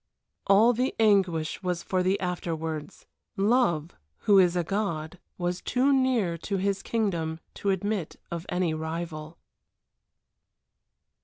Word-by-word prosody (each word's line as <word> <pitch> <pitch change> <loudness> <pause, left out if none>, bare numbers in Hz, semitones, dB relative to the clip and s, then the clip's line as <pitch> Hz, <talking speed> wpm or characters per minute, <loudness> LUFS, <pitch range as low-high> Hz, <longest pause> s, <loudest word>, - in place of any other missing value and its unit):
All 215 +5 +6
the 250 +3 -1
anguish 190 -7 +2
was 180 -2 -2
for 185 -1 0
the 185 +2 +1
afterwards. 165 -3 -4 0.3
Love, 195 -7 +2 0.3
who 200 -2 +5
is 180 -1 +4
a 175 - +1
god, 175 -3 -3 0.2
was 175 0 -2
too 265 +3 +2
near 240 -11 +1
to 195 +4 -2
his 195 +1 0
kingdom 170 -8 -1
to 200 - -2
admit 195 -2 -1 0.2
of 170 0 -5
any 180 -2 0
rival. 160 0 -5
180 Hz, 125 wpm, -27 LUFS, 165-205 Hz, 0.3 s, All